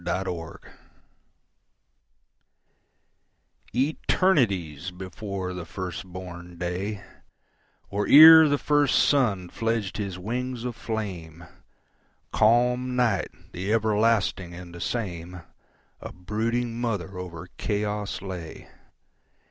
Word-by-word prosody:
Mother 90 -3 -4
Night - - -16 3.0
ETERNITIES 120 - +1
before 95 +1 -6
the 90 -1 -6
first 95 +1 -6
born 90 -1 -9
day, 95 +4 -4 0.9
Or 100 +1 -1
ere 160 +1 +10
the 145 - +2
first 145 -1 +3
sun 110 -11 +2
fledged 115 -2 -2
his 100 -3 -4
wings 120 +5 -4
of 125 -2 -4
flame, 90 -9 -5 0.9
Calm 125 +3 +3
Night, 115 -6 +1 0.2
the 95 +4 -4
everlasting 110 -5 +1
and 90 -1 -10
the 85 - -9
same,A 90 -5 -7
brooding 115 +5 -2
mother 100 -6 -3
over 85 -3 -8
chaos 105 0 -2
lay. 90 -5 -8
100 Hz, 90 wpm, -26 LUFS, 90-115 Hz, 3.0 s, ere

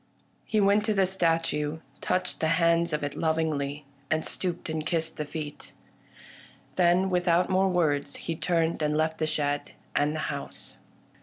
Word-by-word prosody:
He 215 - +1
went 200 +1 +4
to 215 -1 +1
the 195 -1 +4
statue, 165 -4 0 0.2
touched 185 - -1
the 160 - +1
hands 170 0 +3
of 150 -1 -1
it 145 0 -2
lov 160 -1 +1
ingly, 150 -2 -1 0.3
and 155 0 +1
stooped 175 -2 -3
and 160 -1 -2
kissed 160 0 -1
the 150 - -2
feet. 150 0 -7 1.0
Then, 180 +1 +3
without 180 0 +2
more 190 +1 +3
words, 145 -6 +1
he 165 - -4
turned 165 -1 0
and 150 0 +1
left 160 0 0
the 155 - +1
shed 145 -1 -1 0.2
and 150 +1 +2
the - - -2
house. - - -7
165 Hz, 165 wpm, -28 LUFS, 150-180 Hz, 1.0 s, went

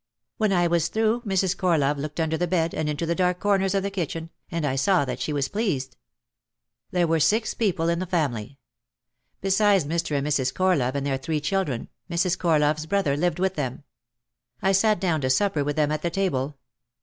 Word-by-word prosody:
When 215 -2 +1
I 175 -2 +3
was 170 -1 +2
through 220 +3 +1
Mrs. 190 -2 +1
Corlove 150 -6 +1
looked 150 +3 -5
under 160 0 +1
the 175 +2 -1
bed 165 -2 0
and 150 - -1
into 150 +2 -2
the 170 - 0
dark 180 0 +1
corners 195 -1 +1
of 195 - +1
the 200 - -2
kitchen, 165 -3 -4 0.2
and 165 -2 -2
I 135 -2 0
saw 175 +2 +2
that 125 -1 -4
she 125 +5 -2
was 140 -2 0
pleased. 140 - -2 0.9
There 175 -1 +1
were 165 0 +1
six 220 +8 +2
people 180 -7 0
in 170 0 +1
the 185 - -3
family. 140 - -2 0.8
Besides 195 -2 +3
Mr. 165 -1 -1
and 140 - -1
Mrs. 135 -3 0
Corlove 155 -9 +1
and 140 0 -2
their 135 -2 -1
three 155 +3 -2
children, 150 -5 -1 0.2
Mrs. 170 +1 +1
Cor 165 -4 +2
love's 150 +1 +1
brother 170 -6 +1
lived 175 +2 0
with 190 +1 0
them. 140 -4 -4 0.8
I 195 - +2
sat 210 +2 +3
down 170 -6 0
to 130 - 0
supper 155 +2 +2
with 145 0 -2
them 150 -1 +1
at 155 0 -1
the 170 - 0
table. 150 -7 -1
165 Hz, 205 wpm, -25 LUFS, 145-190 Hz, 0.9 s, I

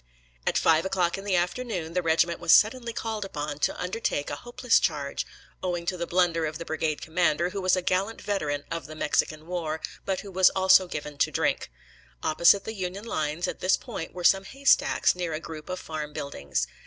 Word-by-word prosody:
At - - +2
five 160 0 +4
o'clock 185 -2 0
in 195 - -9
the 195 -2 +1
afternoon 175 -2 -2
the 180 - +1
regiment 170 +1 +2
was 170 -1 +2
suddenly 235 +2 +5
called 220 -2 -3
upon 150 -6 -5
to - - 0
undertake 180 -6 -2
a - - -2
hopeless 240 - +2
charge, 145 -4 -2 0.3
owing 175 -2 -2
to 180 - -1
the 170 -1 -4
blunder 170 -2 +2
of 155 +1 -5
the 170 - -7
brigade 155 -1 -2
commander, 170 +1 +1
who 200 - -4
was 185 0 +3
a 185 - -2
gallant 195 +5 0
veteran 150 -8 -2
of 165 -4 -4
the 155 - -9
Mexican 155 0 0
war, 165 -3 -3 0.2
but 190 -1 -2
who 200 - -10
was 185 0 +6
also 190 0 +6
given 150 -3 -6
to - - +3
drink. - - 0 0.5
Opposite 170 +5 +5
the 220 - -5
Union 190 +1 -5
lines 155 -5 -2
at - - -5
this 185 - +3
point 210 -10 -6
were 180 - -7
some 195 +2 +4
haystacks, 275 +5 +3
near 175 -3 -3
a 155 - -2
group 160 -1 -9
of 185 - -3
farm 155 -3 -6
buildings. 70 - -3
175 Hz, 205 wpm, -27 LUFS, 155-190 Hz, 0.5 s, was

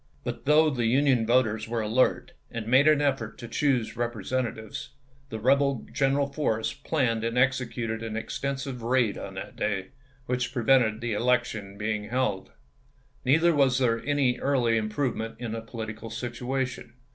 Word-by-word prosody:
But - - -5
though 155 +1 +5
the 120 -4 0
Union 130 -2 +3
voters 115 -3 +2
were 115 0 -1
alert, 110 +4 +1 0.2
and 115 -2 -5
made 130 +6 +5
an 155 -1 +5
effort 135 -6 -1
to 120 - -8
choose 125 -1 0
Repre 120 -1 -3
sentatives, 130 +1 -3 0.4
the 110 - -5
rebel 140 +2 +2
General 140 +1 +2
Forrest 135 -6 -2
planned 120 -8 0
and 115 +1 -1
executed 125 -3 0
an 110 -1 -4
extensive 135 +2 -4
raid 120 -2 +2
on - - -7
that - - -7
day, 100 -3 -2 0.4
which 125 0 -1
pre 120 - -2
vented 115 -3 +4
the 120 -2 -2
election 110 -3 0
being 105 0 -2
held. 105 -4 -1 0.7
Neither 160 +6 +4
was 135 -4 +3
there 115 -3 +1
any 140 -3 +1
early 125 -5 +2
improvement 115 +1 -2
in 120 -2 -5
the 115 0 -4
political 115 -1 -7
situation. 125 +2 -4
120 Hz, 155 wpm, -27 LUFS, 110-135 Hz, 0.7 s, though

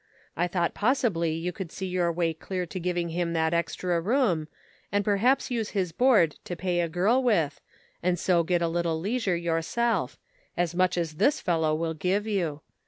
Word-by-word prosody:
I 175 +2 +1
thought 175 -1 0
possibly 210 - +1
you 170 +3 -3
would 180 -4 -5
see 190 - -5
your 180 -2 0
way 165 -1 0
clear 180 +3 -4
to 185 +2 -6
giving 175 -1 -1
him, 170 0 -1
that 160 0 +1
extra 170 +1 0
room, 195 - +1 0.4
and 205 0 +1
perhaps 230 +7 +2
use 225 -3 -1
his 180 -3 0
board 205 - +3
to 175 - -4
pay 180 0 -1
a 170 -1 0
girl 200 +10 +2
with, 170 - +1 0.4
and 180 0 +1
so 175 0 +2
get 170 +1 +1
a - - +2
little 165 -1 -1
leisure 205 0 0
yourself 170 +8 0 0.2
— - - -37
as 175 -1 0
much 185 0 +2
as 160 -3 -2
this 285 - +3
fellow 160 -4 +1
will 165 +1 -2
give 185 +6 0
you. 175 -9 -1
175 Hz, 190 wpm, -27 LUFS, 165-200 Hz, 0.4 s, board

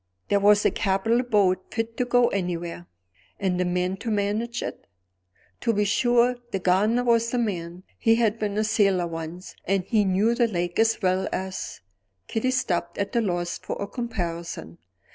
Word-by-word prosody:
"There 200 - +3
was 205 +1 +5
a - - +4
capital 205 +5 +1
boat, 200 -6 +2
fit 225 0 -3
to 250 - +1
go 245 0 +4
anywhere." 175 -2 -3 0.5
"And 180 -2 0
a - - +1
man 180 +1 -1
to 230 - -5
manage 215 +3 -1
it?" - - -7 0.7
"To 230 - +1
be 210 0 +2
sure! 240 +3 +3
the 195 - 0
gardener 200 +6 +2
was 230 -1 +3
the 245 - -1
man; 180 -6 -3 0.2
he 225 -1 +4
had 225 -1 +1
been 210 -1 -2
a 215 - +2
sailor 195 -4 +2
once; 165 +2 -7
and 195 -1 +1
he 210 +2 +2
knew 200 +4 +2
the 235 0 +2
lake 175 -3 -2
as 225 -1 +2
well 185 +1 +1
as 190 - -4 0.2
" 95 -1 -49
Kitty 225 +3 0
stopped, 185 -10 -1
at 200 +4 -3
a 235 - +4
loss 175 -4 -2
for - - -5
a 200 - -2
comparison. 170 - -5
200 Hz, 180 wpm, -25 LUFS, 180-230 Hz, 0.7 s, was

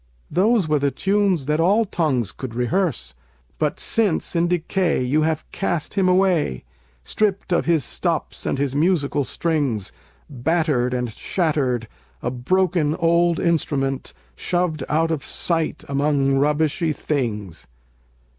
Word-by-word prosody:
Those 200 +2 +3
were 150 -1 +2
the 140 0 +2
tunes 190 +1 +1
that 150 +2 0
all 200 +7 +3
tongues 135 - 0
could 120 +1 -7
rehearse; 125 - -1 0.5
But - - 0
since 210 -6 +1
in 170 +1 +2
decay 175 -3 0
you 140 +5 +1
have 155 -1 0
cast 175 -5 -2
him 190 -3 +2
away, 180 - +2 0.4
Stript 195 - 0
of - - +1
his 160 -6 +2
stops - - -2
and - - 0
his 140 -1 -1
musical 145 -2 +1
strings, 140 - -1 0.4
Battered 140 -2 0
and 125 -3 -2
shattered, 135 - -1 0.4
a 125 - -1
broken 160 +4 +1
old 170 0 +2
instrument, 140 -5 -1 0.2
Shoved 175 - -1
out 160 +2 +1
of 150 -4 -2
sight 165 -2 -1
among 140 -1 +1
rubbishy 155 +3 +1
things. 105 - -3
155 Hz, 130 wpm, -22 LUFS, 135-175 Hz, 0.5 s, Those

